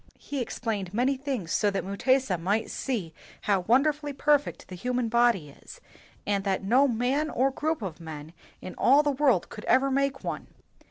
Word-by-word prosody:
He 280 -2 -5
explained 205 -5 -4
many 255 +4 +2
things 260 - -4
so 210 - +2
that 195 - -2
Mutesa 200 0 +1
might 200 +6 -1
see 205 -12 -3 0.3
h6w 195 -3 +1
won 250 +5 +5
derfully 295 -1 -1
perf 290 +1 +2
ect - - -9
the - - -10
human 245 +4 -1
body 235 -9 +2
is, 140 - -14 0.5
and 200 -1 0
that 195 -1 -1
no 255 +8 +4
man 260 +6 0
or 270 0 +1
group 310 -1 -2
of 175 -4 -5
men 160 -1 -9 0.3
in 185 - -6
all 280 +4 +5
the 295 - +1
world 265 -9 +2
could 210 - -9
ever 270 +1 +3
make 275 0 0
one. - - -4
240 Hz, 185 wpm, -27 LUFS, 195-275 Hz, 0.5 s, won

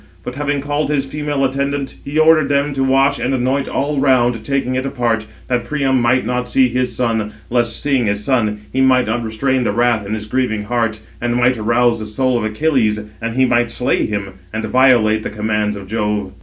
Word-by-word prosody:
But 125 - -5
having 145 +1 -2
called 145 +1 -1
his 140 -2 0
female 145 -1 -2
attendants, 140 +1 -2
he 145 +2 -4
ordered 155 -2 +5
them 140 0 +1
to 135 -1 0
wash 135 +1 +2
and 130 +2 0
anoint 130 +2 0
all 145 +1 -1
round, 125 -4 +2
taking 135 -2 -1
it 130 0 -1
apart, 120 -5 -1 0.2
that 125 -2 0
Priam 135 -4 0
might 125 +2 +2
not 125 0 -2
see 130 -1 +3
his 125 -1 -1
son; 110 -3 -1 0.2
lest, 120 -2 0
seeing 135 -5 +1
his 100 +1 -1
son, 110 -5 0
he 130 - +1
might 130 -1 +4
not 115 +2 -1
restrain 125 +4 0
the 110 - 0
wrath 120 0 +1
in 100 +2 -3
his 105 -1 -5
grieving 110 -2 -1
heart, 110 -1 -1 0.2
and 120 0 0
might 125 +1 +3
arouse 115 +2 +2
the 110 - -6
soul 130 +4 0
of - - -3
Achilles, 110 -2 +1 0.2
and 115 0 -3
he 130 0 +4
might 120 -1 +2
slay 125 +2 0
him, 95 -2 -5
and 110 0 -3
violate 120 -4 +4
the - - -4
commands 105 0 -1
of 100 -1 -8
Jove. 105 -2 -2
125 Hz, 210 wpm, -18 LUFS, 110-135 Hz, 0.2 s, ordered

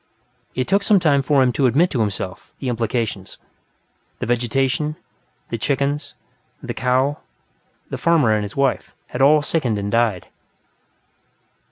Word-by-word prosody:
It 130 0 -1
took 200 +1 +3
some 200 -1 +4
time 145 -5 +3
for 135 0 +3
him 125 - +2
to 130 +2 +2
admit, 160 +9 +3
to 125 - -1
himself, 100 -3 -4
the 130 - -3
implications 115 -4 -2 0.8
of - - -4
vegetation, 135 +5 0 0.5
the 115 - -3
chickens, 140 +4 -1 0.4
the - - -5
cow, 130 +3 +1 0.7
the - - -4
farmer 165 -9 +3
and 105 - +1
his 105 - -7
wife, 140 -2 0
had 125 - -4
all 145 +2 +5
sickened 130 -9 0
and 100 0 -3
died. 115 -6 +1
130 Hz, 145 wpm, -21 LUFS, 115-145 Hz, 0.8 s, all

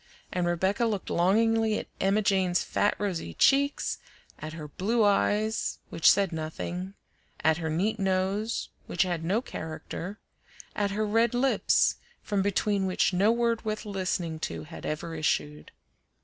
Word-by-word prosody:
And 180 -1 0
Rebecca 190 +6 +1
looked 210 -4 -2
longingly 220 +4 +3
at - - -4
Emma 200 +2 +2
Jane's 190 -3 +2
fat, 205 - +1
rosy 175 - -3
cheeks; 280 +1 +2 0.4
at 155 0 -6
her 155 -2 -7
blue 215 +9 0
eyes, 210 +2 +1
which 165 - +4
said 195 -2 +3
nothing; 170 +4 -5 0.5
at 160 0 +4
her 160 -2 -3
neat 200 +8 0
nose, 195 +3 0 0.2
which 175 - +2
had 175 -3 -2
no 200 +8 +1
character; 165 +2 -6 0.6
at 205 -1 +1
her 210 +2 -1
red 225 +3 +2
lips, 265 +2 +3 0.3
from 205 -2 0
between 200 0 +1
which 185 +1 +1
no 200 +5 +4
word 235 -1 +1
worth 215 0 -3
listening 180 -5 -2
to 80 - -4
had 80 +1 -8
ever 155 +2 -4
issued. 150 -1 -1
195 Hz, 150 wpm, -28 LUFS, 170-215 Hz, 0.6 s, which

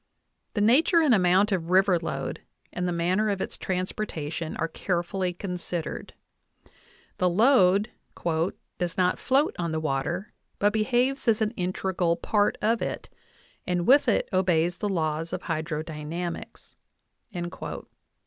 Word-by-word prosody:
The 205 - +1
nature 280 - +5
and 305 -6 +4
amount 190 +1 +4
of 170 -4 -1
river 185 -1 +4
load 165 - -4 0.3
and 180 0 -2
the - - 0
manner 180 +5 +1
of 200 -2 -1
its - - -3
transportation 180 -4 -3
are 165 - 0
carefully 180 +2 -2
considered. 175 -2 -5 1.0
The 180 - +3
load 205 0 +4 0.9
"does 175 -1 -2
not 180 -1 +2
float 275 +4 +2
on 170 -2 -1
the 160 - -1
water, 155 +6 -2 0.2
but 205 +1 +2
behaves 245 +5 +1
as 225 -2 +4
an 215 -1 +1
integral 180 -3 -1
part 205 +4 +1
of 225 +2 +2
it, - - -4 0.6
and 180 -1 0
with 280 +4 +5
ft 230 - +3
obeys 175 -2 +2
the 210 - -2
laws 160 -2 -1
of - - -3
hydrodynamics" 160 +1 -5 0.6
(Uinta, 175 -2 -4
184). - - -7
180 Hz, 140 wpm, -26 LUFS, 170-210 Hz, 1.0 s, nature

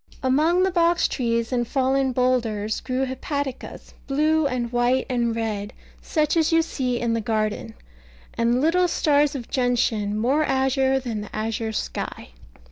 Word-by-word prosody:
Among 310 +8 +3
the 380 - +2
box 345 -1 +3
trees 230 -1 -1
and 240 -1 0
fallen 265 0 +1
boulders 230 -4 0
grew 260 +1 -2
hepaticas, 265 +1 -5
blue 305 +2 +2
and 245 -3 -3
white 245 +1 +1
and 235 -2 0
red, 210 -3 -3 0.3
such 305 -1 0
as 320 -1 +2
you 330 0 +4
see 250 -6 -2
in 235 -1 0
the 230 - 0
garden; 215 - -2 0.6
and 235 +1 +1
little 355 +4 +3
stars 295 -3 +2
of 245 -4 -5
gentian, 230 -5 0
more 265 +8 +2
azure 265 -1 +1
than 235 -5 -4
the 210 - -9
azure 220 +1 -2
sky. 215 - -5
255 Hz, 150 wpm, -23 LUFS, 230-285 Hz, 0.6 s, you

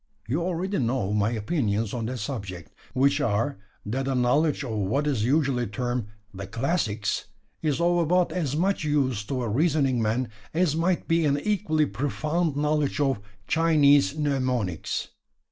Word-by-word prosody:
You 140 +9 0
already 185 +2 -1
know 120 -5 0
my 105 0 +2
opinions 110 - -1
on 115 -3 -2
that 130 +1 -3
subject 100 -6 -6 0.2
which 140 +3 +3
are: 115 -1 0 0.3
that 130 +6 -2
a 135 - 0
knowledge 140 +5 +2
of 125 - -4
what 110 +7 0
is 135 -8 0
usually 130 -1 +1
termed 120 +1 -2 0.3
`the 95 0 -7
classics' 115 - -1 0.4
is 150 -2 0
of 175 +1 +3
about 175 +2 +2
as 150 -6 -1
much 190 +2 +1
use 135 -8 +1
to 130 +2 -2
a - - -2
reasoning 135 0 +2
man 115 +3 0 0.3
as 170 -3 +2
might 170 +2 0
be 165 0 +2
an 145 0 +2
equally 165 -7 +1
profound 150 +4 -1
knowledge 150 0 0
of 135 -5 +1 0.3
Chinese 150 -3 +4
mnemonics. 130 - -1
140 Hz, 155 wpm, -26 LUFS, 115-155 Hz, 0.4 s, Chinese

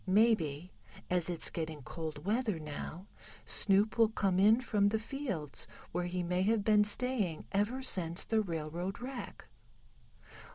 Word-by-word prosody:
Maybe, 185 -6 +2 0.4
as 180 -1 +2
it's 170 -2 +1
getting 160 -3 -4
cold 155 +1 -6
weather 215 -2 0
now, 155 +4 -7 0.4
Snoop 205 +3 +2
will 225 -1 +6
come 195 -4 +1
in 215 +4 +6
from 210 -5 +2
the 220 - +1
fields 220 - -4 0.2
where 175 +1 -1
he 180 0 -2
may 180 +1 0
have 210 +2 +2
been 210 0 +5
staying 210 -7 0
ever 210 +7 0
since 175 -8 +1
the 220 -1 +1
railroad 170 +1 -4
wreck." 255 +1 -7
195 Hz, 140 wpm, -33 LUFS, 170-220 Hz, 0.4 s, will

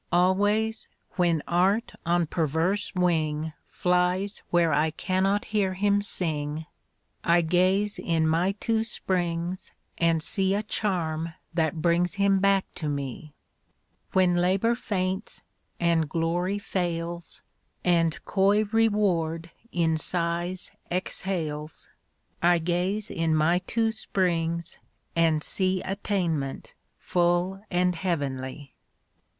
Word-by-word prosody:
Always, 205 +5 +2 0.2
when 170 -4 +1
Art 190 +6 +2
on 175 0 +3
perverse 165 +7 0
wing 160 -3 0 0.2
Flies 180 +3 0
where 170 -2 +3
I 155 +1 +3
cannot 190 +5 0
hear 195 -3 +1
him 205 +1 +2
sing, 155 -5 -2 0.6
I 170 +1 +4
gaze 185 +5 +2
in 165 -2 +1
my 170 +5 +2
two 220 +2 0
springs 180 -4 -2 0.3
and 165 -1 +2
see 195 0 +1
A 210 - -1
charm 165 -7 -2 0.2
that 160 -1 0
brings 175 +2 +2
him 200 -1 +3
back 195 0 +3
to 155 - -2
me. 140 +1 -5 0.8
When 185 -1 +4
Labor 185 +6 +2
faints, 190 -3 -3 0.4
and 165 -3 +2
Glory 175 +5 0
fails, 175 -4 -3 0.4
And 165 -3 +2
coy 200 +2 +3
Reward 180 -7 +1 0.2
in 165 -2 +1
sighs 175 +2 -1 0.2
exhales, 165 -4 -3 0.5
I 175 0 +5
gaze 180 +5 -1
in 165 -1 +1
my 165 +3 +3
two 225 -1 +1
springs 170 -6 -1 0.4
and 160 -2 +3
see 185 -1 0
Attainment 180 -8 -2 0.2
full 175 +2 0
and 180 0 +2
heavenly. 140 -6 -3
175 Hz, 110 wpm, -26 LUFS, 165-195 Hz, 0.8 s, I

